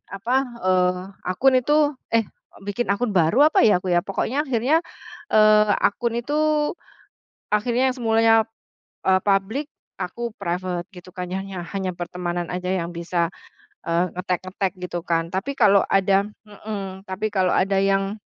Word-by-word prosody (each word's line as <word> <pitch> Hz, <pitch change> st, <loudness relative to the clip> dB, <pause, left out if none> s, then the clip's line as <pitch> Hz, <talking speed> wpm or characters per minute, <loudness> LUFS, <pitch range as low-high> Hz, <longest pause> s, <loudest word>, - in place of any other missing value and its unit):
apa, 235 Hz, +6 st, -1 dB, 0.3 s
eee, 180 Hz, -1 st, +2 dB, 0.3 s
akun 260 Hz, +8 st, +3 dB
itu, 295 Hz, +3 st, +2 dB, 0.2 s
eh, 225 Hz, -, +4 dB, 0.4 s
bikin 205 Hz, +2 st, -3 dB
akun 210 Hz, +3 st, 0 dB
baru 195 Hz, -, +4 dB
apa -, -, +3 dB
ya 180 Hz, -3 st, +3 dB
aku 185 Hz, -, -1 dB
ya 175 Hz, -, +4 dB
pokoknya 270 Hz, +9 st, -1 dB
akhirnya, 260 Hz, +6 st, +2 dB, 0.5 s
eee, 215 Hz, -1 st, +5 dB
akun 235 Hz, +3 st, +1 dB
itu 290 Hz, +5 st, -3 dB, 1.2 s
akhirnya 245 Hz, +4 st, +2 dB
yang 255 Hz, -, -2 dB
semulanya, 225 Hz, -1 st, +3 dB, 0.7 s
eee, 185 Hz, 0 st, +4 dB
public 205 Hz, +8 st, +1 dB, 0.4 s
aku 235 Hz, +5 st, -4 dB
private 180 Hz, -1 st, -3 dB
gitu 180 Hz, +1 st, -12 dB
kan 180 Hz, -1 st, -5 dB
ya 190 Hz, -, -2 dB, 0.3 s
hanya 190 Hz, -2 st, -2 dB
pertemanan 175 Hz, -1 st, -4 dB
aja 180 Hz, 0 st, -3 dB
yang 170 Hz, -3 st, -1 dB
bisa, 170 Hz, 0 st, -1 dB, 0.6 s
eee, 170 Hz, +2 st, +2 dB
ngetag-ngetag 185 Hz, +1 st, -2 dB
gitu 175 Hz, -1 st, -4 dB
kan 165 Hz, -1 st, 0 dB
tapi 195 Hz, +9 st, -2 dB
kalau 200 Hz, -3 st, +5 dB
ada 195 Hz, 0 st, +3 dB, 0.2 s
mhm, 200 Hz, -2 st, -7 dB
tapi 195 Hz, +3 st, -2 dB
kalau 185 Hz, -2 st, +2 dB
ada 195 Hz, +1 st, +2 dB
yang 195 Hz, +1 st, +1 dB
195 Hz, 145 wpm, -23 LUFS, 180-225 Hz, 1.2 s, eee